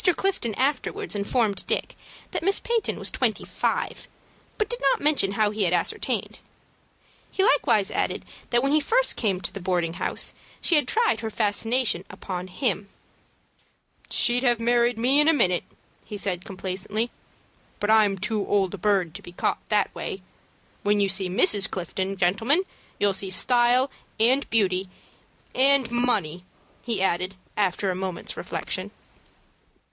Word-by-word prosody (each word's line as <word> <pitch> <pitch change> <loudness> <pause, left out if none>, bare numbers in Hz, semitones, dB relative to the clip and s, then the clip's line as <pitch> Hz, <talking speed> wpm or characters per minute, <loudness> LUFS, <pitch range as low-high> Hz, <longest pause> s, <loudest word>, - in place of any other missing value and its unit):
Clifton 370 - -1
afterwards 275 +1 -1
informed 205 +1 0
Dick - - -1 0.4
that - - -2
Miss 390 +3 +2
Peyton 465 -2 -1
was - - +1
twenty - - 0
five, - - -2 0.5
but 430 - 0
did 485 +2 -4
not - - +2
mention 285 -10 +1
how 210 0 +2
he 215 0 -4
had 185 - +2
ascertained. - - -1 0.9
He 380 - 0
likewise - - +3
added - - -2 0.2
that 240 +1 +2
when 275 - +1
he 305 - +4
first - - +3
came 200 -5 0
to 170 - -3
the 200 - -6
boarding 175 -3 -1
house, - - 0 0.3
she - - +3
had 300 -2 +3
tried 460 0 +2
her 225 - -4
fascinations 220 -1 0
upon 180 -1 -6
him. 200 -1 -2 1.2
"She'd 245 +1 +3
have 240 -3 +2
married 240 0 +2
me 255 +5 +3
in 295 - +4
a 325 - +6
minute," 180 - +2 0.4
he 210 - -7
said 185 -3 -2
complacently; 200 +3 -3 0.7
"but 205 +1 +1
I'm 210 -3 +4
too 210 +2 -1
old 195 -2 +1
a 200 - -6
bird 190 -4 +1
to - - -7
be 175 - -11
caught - - -1
that 210 -2 +1
way. 190 - -5 0.6
When 205 0 +2
you 200 -1 +2
see 190 -1 0
Mrs. 195 +3 +4
Clifton, 190 +2 -3
gentlemen, 225 - +2 0.3
you'll 205 -1 +2
see 190 0 -2
style 245 +6 +3 0.3
and 255 +5 +3
beauty, 190 -4 +1 0.6
and 270 -2 +3
money" 210 -9 0 0.4
he 225 -6 -1
added, 185 +1 0 0.2
after 195 -1 0
a - - -3
moment's 185 -1 -4
reflection. - - -4
210 Hz, 155 wpm, -25 LUFS, 190-250 Hz, 1.2 s, a